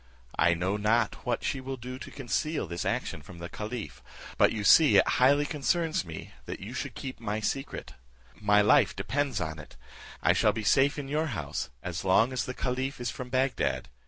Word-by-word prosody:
I 85 0 +4
know 90 +4 -1
not 110 +3 +1
what 120 - 0
she 135 - -1
will 135 0 -5
do 125 +2 -7
to - - -8
conceal 150 +3 -2
this 85 0 -4
action - - -2
from 85 +4 -12
the 85 0 -7
caliph, 110 +1 -6 0.3
but - - +4
you 110 -2 -3
see 120 -1 +7
it 95 - +5
highly 140 +3 +4
concerns 160 - 0
me 80 -3 -8 0.2
that - - -5
you - - -7
should - - -4
keep 130 -4 -6
my 110 -2 -2
secret. 135 +6 -4 0.4
My 105 -1 +3
life 105 - +4
depends 140 -4 -1
on 80 -2 -4
it. 75 - -12 0.5
I - - +5
shall - - +3
be 110 - -4
safe 135 +7 +3
in 140 -2 -4
your 155 +3 0
house 75 -4 -4
as 90 -2 -4
long 110 +7 +3
as 125 - -1
the 125 - -5
caliph 130 +2 -2
is 120 -2 -2
from 125 -1 -7
Bagdad. 130 +1 0
120 Hz, 200 wpm, -29 LUFS, 100-135 Hz, 0.5 s, see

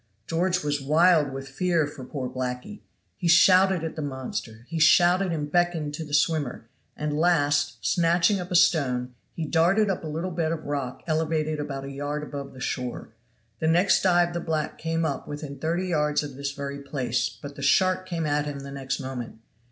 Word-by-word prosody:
George 180 +2 0
was 145 -1 -1
wild 155 +1 +4
with 135 0 -6
fear 165 +3 +1
for 145 -2 -9
poor 130 0 -4
blackee. 130 +11 -5 0.4
He 175 - -2
shouted 185 +1 +5
at 160 - -4
the 155 - -4
monster, 130 -5 -5
he 165 -1 -3
shouted 175 +4 +5
and 150 -3 -3
beckoned 175 -4 +1
to 160 - -4
the 150 - -10
swimmer; 145 -6 0 0.3
and 150 -1 -2
last, 145 -4 +2
snatching 170 - +3
up 180 0 -6
a 180 - -2
stone, 130 -8 +3 0.2
he 165 - -3
darted 180 +7 +3
up 180 - -4
a - - -4
little 165 +4 -3
bed 165 -2 -1
of 160 -2 -4
rock 140 -3 -4
elevated 155 -1 0
about 135 -2 -4
a 140 - -6
yard 145 +2 -3
above 140 -2 -7
the 130 - -12
shore. 125 -1 -4 0.5
The 160 - 0
next 175 +4 +4
dive 175 -2 +3
the 175 - -2
black 160 -2 -3
came 165 0 -1
up 140 -3 -3
within 145 -1 -7
thirty 175 +3 -1
yards 150 -3 +1
of 145 -2 -7
this 140 +1 -4
very 140 0 -5
place, 130 -4 -2
but 145 0 -9
the - - -8
shark 185 +6 +3
came 165 -2 -2
at 150 0 0
him 140 -1 -5
the 140 0 -8
next 135 -1 -3
moment. 130 -4 -6
150 Hz, 195 wpm, -26 LUFS, 140-170 Hz, 0.5 s, shouted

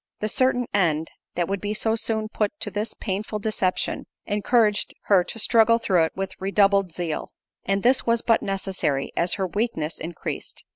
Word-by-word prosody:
The 215 - 0
certain 250 +2 +2
end, 165 -5 +1 0.2
that 175 -1 0
would 195 0 -2
be 210 +1 -2
so 220 +1 +1
soon 220 -1 -1
put 210 -1 -2
to 205 - -1
this 210 +3 -3
painful 210 +1 -3
deception, 200 -3 -1 0.2
encouraged 210 0 +2
her 195 -3 +4
to - - -7
struggle 230 +1 +4
through 185 -7 +2
it - - -6
with 190 0 -5
redoubled 195 -1 +3
zeal; 165 -2 -3 0.4
and 195 +1 0
this 255 +2 +4
was 230 0 +1
but 230 -1 +3
necessary, 190 -8 -1
as 175 +1 +1
her 190 - -1
weakness 185 -5 -2
increased. 165 +1 -6
200 Hz, 175 wpm, -24 LUFS, 185-220 Hz, 0.4 s, her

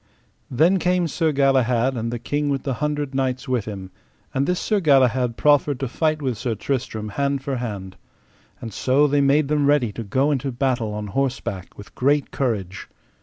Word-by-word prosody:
Then 170 +9 +3
came 180 0 +1
Sir 160 +1 0
Galahad, 130 -3 +2
and 115 0 -3
the 120 - -2
King 145 +5 -2
with 135 -2 -1
the 135 - -1
Hundred 150 -2 -1
Knights 130 0 -1
with 125 -5 0
him; 95 -3 -7 0.4
and 135 +1 0
this 180 0 0
Sir 210 -2 +1
Galahad 130 -6 +3
proffered 145 -2 +3
to 135 - -2
fight 155 +4 -1
with 125 -5 -2
Sir 120 -3 -2
Tristram 110 -2 -3
hand 140 +5 -1
for 135 -1 -2
hand. 100 -6 -6 0.6
And 115 -3 -7
so 135 +7 +2
they 145 0 +2
made 140 +1 +3
them 145 -1 +1
ready 145 -6 +3
to 115 - -6
go 130 +8 +1
unto 140 -1 -1
battle 120 -3 -1
on 105 0 -4
horseback 115 -4 -3
with 100 - -12
great 140 +2 +1
courage. 105 -8 -3
135 Hz, 185 wpm, -22 LUFS, 115-145 Hz, 0.6 s, Then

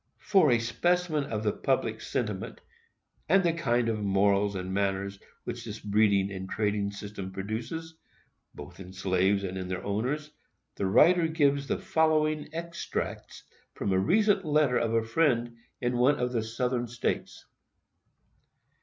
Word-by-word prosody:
For 190 -7 +3
a 120 - +5
specimen 155 +6 0
of 110 -5 -3
the 105 - +2
public - - -1
sentiment - - -3 0.7
and 195 +3 +5
the 170 -2 +2
kind 120 -8 +1
of 110 -2 -1
morals 100 0 +2
and 95 0 -4
manners 100 0 -1 0.2
which - - -5
this - - -7
breeding 100 -1 +2
and 95 -1 -6
trading 105 -1 0
system 100 -1 -7
produces, 115 - -5 0.6
both - - -10
in 95 -1 -10
slaves 95 +1 +1
and 95 0 -4
in 95 - -5
their 90 -1 -4
owners, 130 +10 -2 0.4
the 100 - -2
writer 165 - +5
gives 140 -3 +1
the - - 0
following 155 -1 +1
extracts 170 +1 -5 0.3
from 100 - -1
a 95 - +3
recent 200 - +3
letter 150 -5 +2
of 115 -1 0
a 115 - +2
friend 120 -2 +1 0.2
in 120 0 -1
one 130 +4 +5
of 125 0 -1
the 115 -2 0
Southern 120 +2 -2
States. 120 +1 -3
115 Hz, 150 wpm, -28 LUFS, 100-150 Hz, 0.7 s, a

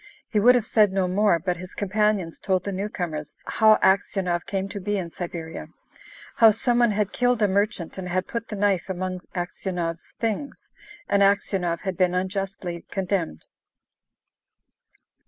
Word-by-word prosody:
He 215 - +1
would 245 +4 +6
have 240 -3 +1
said 210 -3 +4
no 190 -1 +1
more, 200 0 +3
but 175 +1 -2
his 180 +1 -10
companions 205 -3 0
told 190 -2 0
the 200 - -3
newcomers 175 -6 -4
how 220 -1 +5
Aksionov 190 -2 +1
came 195 -1 -2
to 205 - -5
be 205 +2 -1
in 175 -3 -4
Siberia; 165 -2 -6 0.7
how 225 - +8
some 240 +3 +1
one 240 -1 +5
had 210 -1 -1
killed 245 -1 +2
a - - +5
merchant, 195 -2 -1
and 180 -1 -5
had 185 +1 0
put 230 -1 -4
the 210 - -5
knife 195 -2 +1
among 185 0 -3
Aksionov's 175 -1 -4
things, 230 +5 -3 0.4
and 200 - +2
Aksionov 195 -3 +2
had 190 -3 -3
been 180 -1 +2
unjustly 190 -2 -3
condemned. 185 - -2
190 Hz, 155 wpm, -25 LUFS, 180-210 Hz, 0.7 s, how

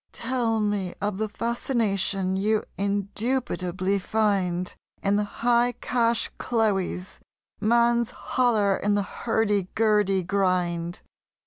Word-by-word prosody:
Tell 235 -2 -1
me 205 -4 -1
of 205 -1 -2
the 220 0 -1
fascination 205 -5 0
you 210 +3 +1
indubitably 200 -2 -1
find 190 -4 0 0.3
In 200 +1 +2
the 210 - +2
"High 240 +3 +1
Cash 235 -2 +1
Cloe's!" 195 -6 -1 0.4
man's 235 +2 +3
holler 220 -6 +1
in 205 0 +1
the 205 - +1
hurdy 205 -2 0
gurdy 210 -4 +2
grind. 175 -2 0
205 Hz, 105 wpm, -25 LUFS, 190-230 Hz, 0.4 s, man's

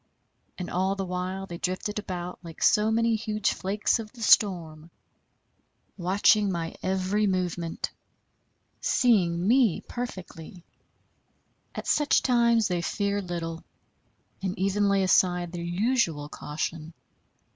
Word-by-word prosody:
And 180 - -5
all 190 +2 0
the 195 -1 -3
while 185 +1 -3
they 170 -2 -8
drifted 185 +3 -2
about 180 -3 -6
like 165 -2 -7
so 210 0 +4
many 230 0 +2
huge 215 -1 -1
flakes 205 +5 0
of 215 -2 -7
the 235 -3 -8
storm, 165 -8 +3 1.1
watching 200 +3 +3
my 165 -2 -3
every 190 +3 0
movement, 180 -3 -2 0.9
seeing 185 -8 +2
me 240 -5 +3
perfectly. 185 -7 -8 1.1
At - - -5
such 295 -1 +3
times 235 -3 +3
they 180 -2 -1
fear 200 +3 -1
little, 170 -2 -5 0.8
and 190 -1 -3
even 195 +2 +1
lay 195 -1 +3
aside 180 -2 +2
their 175 -1 -5
usual 175 - 0
caution. 155 +2 -5
190 Hz, 120 wpm, -27 LUFS, 175-210 Hz, 1.1 s, so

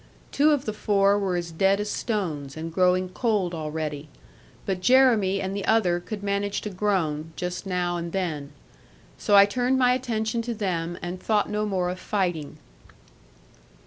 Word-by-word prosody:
Two 295 +2 +4
of 290 -3 +1
the 215 - -2
four 200 -1 +2
were 190 -3 -1
as 170 -1 -3
dead 195 +4 +2
as 210 - -2
stones, 160 - -3
and 165 +1 -6
growing 185 +1 +3
cold 195 -3 0
already, 155 -2 -4 0.6
but 190 -2 -2
Jeremy 220 -4 +4
and 190 0 -3
the 200 - -3
other 185 -6 +2
could 205 +3 -7
manage 200 0 -1
to 210 - -5
groan, 165 -6 -1
just 180 +2 -4
now 180 -1 -1
and 170 0 -5
then. 160 -7 -3 0.7
So 205 - +2
I 200 0 +9
turned 250 +5 0
my 250 -1 +4
attention 230 -3 -1
to 235 0 -4
them, 175 -5 -2
and 180 +1 -5
thought 210 -2 +1
no 210 0 -1
more 180 -3 -1
of 185 - -7
fighting. 175 -9 -2
190 Hz, 170 wpm, -25 LUFS, 175-210 Hz, 0.7 s, I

